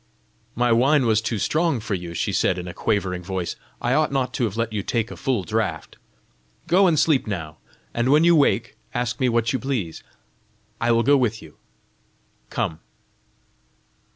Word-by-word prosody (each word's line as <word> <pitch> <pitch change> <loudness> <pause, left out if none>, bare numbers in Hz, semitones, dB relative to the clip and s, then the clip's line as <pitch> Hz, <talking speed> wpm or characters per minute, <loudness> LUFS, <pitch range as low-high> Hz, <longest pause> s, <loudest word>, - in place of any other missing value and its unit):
"My 120 0 +2
wine 130 +4 +4
was 110 -2 +3
too 115 0 -2
strong 155 - +1
for 110 0 -4
you!" 85 -2 -5
she - - -1
said, 90 - +2
in 90 0 -5
a 90 - -6
quavering 95 -4 -1
voice; 90 -1 -4 0.2
"I 120 - 0
ought 155 +1 +2
not 130 -2 -1
to 120 - 0
have 110 -1 -4
let 115 -1 -1
you 105 - -1
take 115 +3 -2
a - - -7
full 130 -7 -1
draught! 85 - -3 0.7
Go 190 +2 +4
and 165 -3 +2
sleep 150 -5 +2
now, 80 -7 -5 0.4
and 120 +2 0
when 150 +3 +5
you 170 0 +6
wake 120 -6 +2 0.2
ask 120 -2 -2
me 130 - +2
what 115 0 +1
you 130 - 0
please. 120 -12 -3 0.8
I 120 +1 +2
will 115 0 +3
go 140 +2 +5
with 115 -4 0
you: 75 - -15 0.9
come." 80 - -2
115 Hz, 180 wpm, -23 LUFS, 100-135 Hz, 0.9 s, you